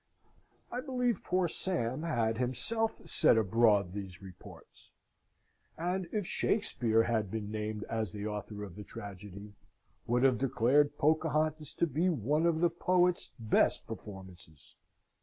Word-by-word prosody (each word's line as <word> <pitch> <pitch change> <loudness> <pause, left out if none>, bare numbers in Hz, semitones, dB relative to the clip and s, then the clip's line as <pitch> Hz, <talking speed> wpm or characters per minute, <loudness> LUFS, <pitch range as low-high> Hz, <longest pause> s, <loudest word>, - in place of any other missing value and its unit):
I 245 - -3
believe 250 -6 -1
poor 180 0 +1
Sam 155 -8 -1
had 115 -8 0
himself 130 - 0
set - - +4
abroad 105 -3 +3
these 95 -2 -7
reports; 95 -3 -14 0.9
and, 180 +2 -2
if 210 -3 -1
Shakspeare 115 - +1
had 110 -4 0
been 105 0 -4
named 105 0 -3
as 110 -4 -3
the 105 0 -6
author 105 0 -5
of 95 -4 -9
the 105 - -8
tragedy, 100 +1 -9 0.5
would 125 +2 +2
have 130 -4 +4
declared 135 +3 +2
Pocahontas 155 0 +1
to - - +1
be 165 +4 +1
one 150 - +1
of 165 -1 +1
the 175 - +4
poet's 180 +1 +1
best 110 -2 +2
performances. 95 -6 -11
120 Hz, 135 wpm, -32 LUFS, 105-165 Hz, 0.9 s, set